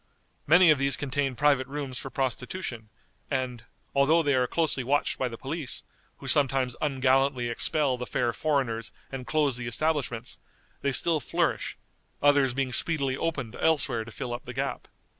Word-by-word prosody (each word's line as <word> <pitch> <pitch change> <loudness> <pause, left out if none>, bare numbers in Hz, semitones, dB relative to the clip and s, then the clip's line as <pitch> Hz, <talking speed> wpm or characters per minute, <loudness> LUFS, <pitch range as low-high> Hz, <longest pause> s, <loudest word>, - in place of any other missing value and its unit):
Many 175 +2 +7
of 150 - +3
these 135 -1 +2
contain 135 -1 -1
private 140 -1 +3
rooms 135 -2 -4
for 135 - -6
prostitution, 125 -2 -3 0.4
and, 125 -4 -2 0.3
although 155 +4 +4
they 145 -2 +2
are 125 -1 +2
closely 155 -5 0
watched 145 +4 0
by 130 - +1
the 115 -2 -7
police, 145 +1 -5 0.3
who - - -10
sometimes 135 -3 +2
ungallantly 135 -3 +2
expel 135 +2 +1
the 125 - -4
fair 120 -1 0
foreigners 130 -7 -1 0.2
and 130 -2 -6
close 145 -5 +2
the 125 -1 -4
establishments, 135 -2 -1 0.4
they 140 - +1
still 160 +4 +4
flourish, 135 - -1 0.4
others 140 -3 +4
being 135 -2 -1
speedily 140 -4 +1
opened 135 -7 -3
elsewhere 135 -8 +1
to 115 - -11
fill 120 +2 -5
up 120 - -6
the 125 - -7
gap. 135 +2 -3
135 Hz, 160 wpm, -27 LUFS, 125-145 Hz, 0.4 s, Many